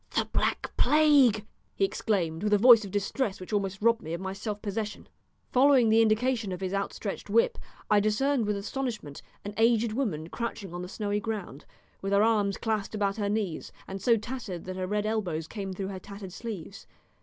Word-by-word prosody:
"The - - +2
Black - - 0
Plague!" 285 -8 +5 0.3
he 195 - +3
exclaimed 180 -6 -1
with 210 0 +1
a - - +6
voice 230 +1 +8
of 200 - -6
distress 205 +2 -1
which 185 +3 -8
almost 195 0 -1
robbed 230 0 +4
me 160 - -6
of - - -6
my 190 0 -4
self 205 +1 -4
possession. 210 0 -4 0.4
Following 260 -3 +5
the 225 +1 +5
indication 225 -1 +1
of 180 - -4
his 190 0 -3
outstretched 195 0 -3
whip 470 +1 +2 0.3
I 210 - +4
discerned 225 +4 +1
with 210 -1 0
astonishment 215 - -4 0.2
an 205 - -5
aged 225 -1 +3
woman 180 - -2
crouching 220 -5 -5
on 175 - -4
the 180 - -5
snowy 205 0 -2
ground, 210 -10 -5 0.4
with 195 +1 -2
her 200 +1 +5
arms 210 -3 +2
clasped 220 -2 -2
about 200 -1 0
her 205 -2 -1
knees, 205 -6 -2 0.2
and 195 0 -6
so 230 +3 +4
tattered 215 -6 -6
that 185 0 -5
her 185 0 -3
red 210 +1 -1
elbows 180 -8 -2
came 195 -1 -5
through 190 +1 -4
her 190 -1 -6
tattered 200 -1 -9
sleeves. 205 -4 -7
210 Hz, 195 wpm, -28 LUFS, 195-225 Hz, 0.4 s, voice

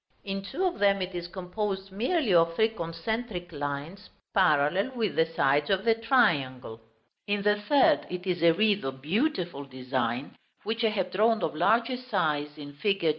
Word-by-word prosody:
In 195 0 -4
two 360 - -3
of 360 -1 -1
them 200 -1 +3
it 185 0 -4
is 175 -1 -5
composed 190 +2 -4
merely 240 - 0
of 165 -1 +4
three 220 +3 +3
concentric 180 +1 -4
lines, 145 +6 -5 0.2
parallel 180 - +3
with 225 -5 -1
the 160 - +3
sides 145 -2 +1
of 195 +1 +1
the 230 - +5
triangle; 145 - +1 0.5
in 205 0 0
the 210 0 +3
third, 295 +7 +3
it 180 +1 -5
is 180 -3 -1
a 170 0 +6
wreath 205 +3 +2
of 135 0 -5
beautiful 180 - -1
design, 130 -1 -3 0.3
which 225 +2 -2
I 225 - +4
have 190 -4 -2
drawn 220 +3 +2
of 155 - -1
larger 230 +10 +2
size 150 - -2
in 145 -1 -9
fig. 195 +4 -1
185 Hz, 175 wpm, -28 LUFS, 150-220 Hz, 0.5 s, a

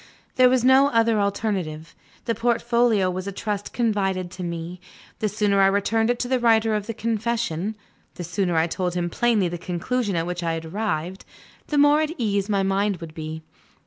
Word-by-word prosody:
There 255 -1 +6
was 255 -1 +2
no 265 +2 +6
other 230 -4 +2
alternative. 190 -6 -2 0.3
The 230 - 0
portfolio 235 -2 +2
was 185 +1 -5
a - - -2
trust 205 0 -4
confided 195 -6 -1
to 185 - -7
me; 170 +1 -5 0.4
the 215 - 0
sooner 205 -1 +1
I 195 - +6
returned 215 +3 +1
it 245 - +1
to 245 - -2
the 260 0 +1
writer 225 -2 +3
of 210 -1 -2
the 230 - -3
confession 220 -4 -2 0.4
the 175 - -6
sooner 175 +1 -1
I 160 - +3
told 180 +1 -2
him 175 -1 -1
plainly 225 -4 +2
the 175 0 -5
conclusion 195 +5 -2
at 165 0 0
which 175 0 -4
I 165 -1 -1
had 165 0 -5
arrived 185 -1 -3 0.4
the 295 - -1
more 290 +1 +5
at 310 +1 -1
ease 205 -4 -1
my 200 -2 +1
mind 195 0 0
would 165 -2 -9
be. 160 0 -6
200 Hz, 195 wpm, -23 LUFS, 175-230 Hz, 0.4 s, There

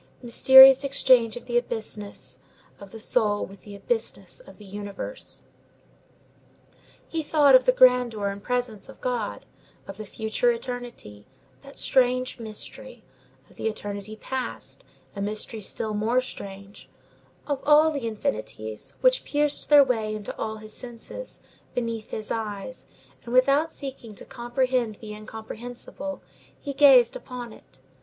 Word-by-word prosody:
Mysterious 265 +3 +8
exchange 255 -5 +3
of - - -10
the 240 -1 +2
abysses 210 - -5 0.4
of 200 - -11
the 225 - -10
soul 215 -2 +1
with 195 +1 -14
the 205 -1 -11
abysses 455 - -3
of - - -15
the 210 - -14
universe! 205 - -7 1.6
He 325 - -2
thought 295 -2 +4
of 255 -1 +7
the - - +6
grandeur 250 -5 +4
and 200 0 -6
presence 245 -3 -3
of - - -13
God; 240 -4 -3 0.4
of - - -8
the 215 -1 -8
future 220 - 0
eternity, 245 - -7 0.3
that 275 0 -14
strange 255 -1 +1
mystery; 225 - -8 0.4
of - - -22
the - - -2
eternity 205 -1 -5
past, 260 +4 -5 0.3
a 200 - -5
mystery 215 +2 -4
still 215 +2 -4
more 220 +4 +1
strange; 200 -5 -9 0.6
of 285 -2 -2
all 305 +2 +6
the 280 -6 -3
infinities, 110 - -4
which - - +4
pierced 295 0 -1
their 295 -1 +9
way 220 -5 -1
into 210 -1 -6
all 220 0 -4
his 215 0 -11
senses, 245 - -8 0.3
beneath 230 -3 -3
his 215 -1 -5
eyes; 220 +2 -5 0.4
and, 240 - -7
without 275 +5 +4
seeking 260 -8 -8
to - - -9
comprehend 240 -2 -1
the 210 0 -9
incomprehensible, 225 +6 -8 0.4
he 285 - -5
gazed 270 -4 +6
upon 245 -3 -8
it. - - -19
240 Hz, 140 wpm, -25 LUFS, 215-265 Hz, 1.6 s, their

